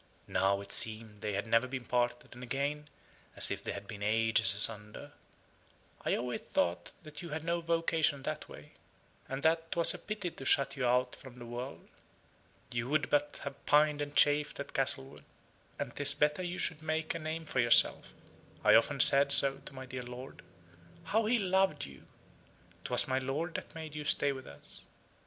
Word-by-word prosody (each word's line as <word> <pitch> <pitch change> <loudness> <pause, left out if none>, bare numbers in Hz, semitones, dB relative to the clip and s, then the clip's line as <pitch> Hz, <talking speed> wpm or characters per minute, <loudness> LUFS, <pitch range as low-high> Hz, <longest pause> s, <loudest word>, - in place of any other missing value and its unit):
(Now, 100 +1 +1
it 100 - -11
seemed 110 -2 -1
they 105 -2 -2
never 115 +2 +2
had - - -9
been 130 -2 -5
parted, 120 0 -1
and 120 - -12
again, 140 +4 -3 0.5
as - - +3
if - - -4
they - - -4
had 100 0 -8
been 105 -3 -9
ages 110 -1 +4
asunder.) 105 0 +2 0.9
"I - - +1
always 125 0 -4
thought 85 0 -2 0.2
you 170 - -7
had 155 +1 -5
no 170 +1 -1
vocation 165 -4 0
that - - -5
way; - - -13 0.6
and 135 +2 -5
that 165 0 +1
'twas 170 -1 +5
a - - -8
pity 210 -4 -5
to 135 - -10
shut 140 +1 +2
you 130 -3 -1
out 125 +1 +1
from 130 -2 -13
the 120 - -9
world. 120 +3 -7 0.8
You 120 +1 -3
would 145 -3 0
but 145 0 0
have 140 0 -8
pined 150 0 +4
and 145 0 -5
chafed 145 0 +3
at - - -7
Castlewood: 65 - -1 0.5
and - - -5
'tis 140 0 +5
better 150 +3 +1
you 180 0 -4
should 160 -1 -1
make 155 0 -2
a 165 - -5
name 160 +1 -5
for 130 - -2
yourself. 120 -1 +3 0.5
I - - +6
often - - +3
said 140 0 +6
so 140 -1 +6
to - - -9
my 130 0 -8
dear 130 0 -6
lord. 125 +2 -10 0.6
How 220 +1 0
he 240 +2 +3
loved 190 -6 +1
you! 70 -1 -14 0.8
'Twas - - +1
my 130 0 0
lord 145 +6 -3
that - - -7
made 160 -2 -7
you 150 0 -5
stay 145 -1 +2
with 130 -2 -8
us." 70 - -8
135 Hz, 185 wpm, -32 LUFS, 120-155 Hz, 0.9 s, I